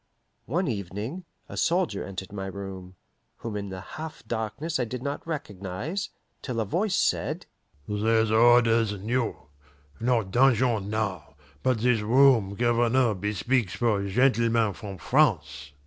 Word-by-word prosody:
One 170 +8 0
evening, 110 - -4 0.2
a - - -9
soldier 170 - +1
entered 95 0 -7
my 95 -1 -4
room, 95 -1 -7 0.4
whom 115 -2 -6
in 100 -1 -4
the 95 -1 -6
half 155 - -8
darkness 125 +9 -3
I - - +2
did 125 +2 -5
not 140 +3 -4
recognize, 135 - -4 0.3
till 125 -4 -3
a 110 - 0
voice 185 - 0
said, - - 0 0.4
"There's 110 +1 +1
orders 115 -1 +5
new! 115 +4 -1 0.6
Not 115 -4 +1
dungeon 120 -4 +3
now, 110 -3 -3 0.3
but 125 -4 +1
this 120 -2 +3
room 115 -3 +4
Governor 120 +1 +2
bespeaks 105 +1 -1
for 105 -4 +1
gentlemen 115 -1 +2
from 100 -3 -8
France." 70 -4 +1
115 Hz, 130 wpm, -26 LUFS, 100-125 Hz, 0.6 s, orders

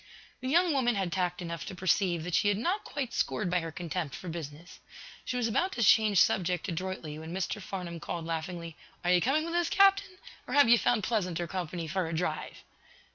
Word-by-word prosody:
The 255 - -4
young 340 +2 +4
woman 245 -4 +2
had 190 -3 -1
tact 180 0 -1
enough 170 -3 -5
to 190 - -6
perceive 180 -2 +1
that 175 +1 -5
she 205 - +3
had 205 -1 +2
not 355 - -1
quite 265 -4 -4
scored 185 -5 -1
by 180 - +3
her 165 -1 -5
contempt 165 -3 -4
for 180 - -7
business. 160 +1 -8 0.5
She 250 - -2
was 240 -2 +1
about 360 - 0
to 240 - 0
change 210 -2 +5
subject 180 0 +2
adroitly, 170 -4 -4
when 160 +1 -8
Mr. 190 +2 -2
Farnum 180 -3 -6
called, 165 +1 -5
laughingly: 165 0 -4 0.3
"Are 175 - +2
you 180 -1 +5
coming 295 - +2
with 335 - -4
us, 345 -1 +1
captain? 390 -1 +4 0.3
Or, - - -3
have 285 -4 +7
you 235 0 +6
found 235 -4 +2
pleasanter 180 -7 -1
company 175 -1 -4
for 175 +2 -1
a 160 - -3
drive?" 175 +3 -3
185 Hz, 210 wpm, -30 LUFS, 170-240 Hz, 0.5 s, have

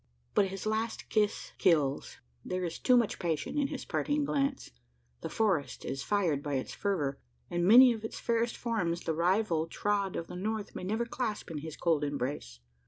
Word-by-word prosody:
But 200 - +4
his 195 +1 -6
last 220 +1 -2
kiss 210 -2 0
kills: 145 -5 +2 0.3
there 185 0 -3
is 170 -2 -4
too 250 -1 +5
much 235 -4 +1
passion 165 - -2
in 280 - +2
his 280 -2 -6
parting 290 0 0
glance. 275 -1 -1 0.5
The - - -4
forest 195 -10 0
is 135 - -3
fired 170 -6 +1
by 145 -1 -2
its 130 - -3
fervour; 150 -9 -1 0.3
and 175 0 +1
many 245 +3 +9
of 225 -1 -8
its 220 - -5
fairest 235 0 0
forms 180 -8 -1
the 160 - -1
rival 170 0 +1
trod 200 +1 -1
of 165 - -3
the 180 - -9
north 210 +2 -3
may - - -6
never 220 +5 -1
clasp 225 -6 -3
in 155 - -4
his 155 0 -7
cold 160 -4 +1
embrace. 130 - -3
195 Hz, 185 wpm, -31 LUFS, 160-225 Hz, 0.5 s, many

